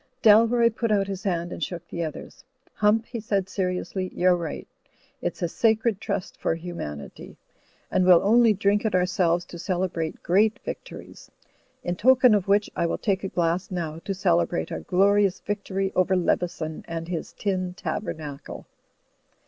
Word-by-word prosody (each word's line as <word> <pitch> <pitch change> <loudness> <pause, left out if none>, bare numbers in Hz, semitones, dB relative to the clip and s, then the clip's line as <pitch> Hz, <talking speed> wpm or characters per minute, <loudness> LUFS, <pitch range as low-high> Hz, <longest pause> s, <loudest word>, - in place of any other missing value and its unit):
Dalroy 230 +2 +6
put 230 -2 -1
out 200 -2 +3
his 195 -1 -5
hand 175 -3 -1
and - - -5
shook 175 +2 -5
the 170 - -4
other's. 155 -2 -8 0.3
"Hump," 215 +2 +2
he 235 - -6
said, 200 -3 -1
seriously, 185 0 -2
"you're 180 0 +4
right. 170 -3 -5 0.5
It's - - -3
a - - +2
sacred 220 +2 +1
trust 180 - -4
for - - +1
Humanity; 165 - -8 0.5
and 185 - +2
we'll 180 -2 +6
only 230 +3 +5
drink 205 0 +1
it 215 -4 0
ourselves 175 -1 +1
to 175 - -10
celebrate 175 -3 -2
great 210 +5 +3
victories. - - -8 0.5
In 175 - -2
token 250 +3 +5
of 200 -3 +1
which 205 +1 +3
I 170 - +1
will - - -2
take 195 -3 -1
a - - -1
glass 175 +1 0
now, 165 -4 -4
to 195 - -4
celebrate 175 -2 +1
our - - -4
glori 200 +2 +3
ous 185 - -8
victory 195 -1 -3
over 185 +1 +3
Leveson 170 -3 -1
and 165 0 -5
his 170 -2 -4
tin 185 -3 -2
tabernacle." 150 -9 -5
185 Hz, 165 wpm, -25 LUFS, 175-205 Hz, 0.5 s, Dalroy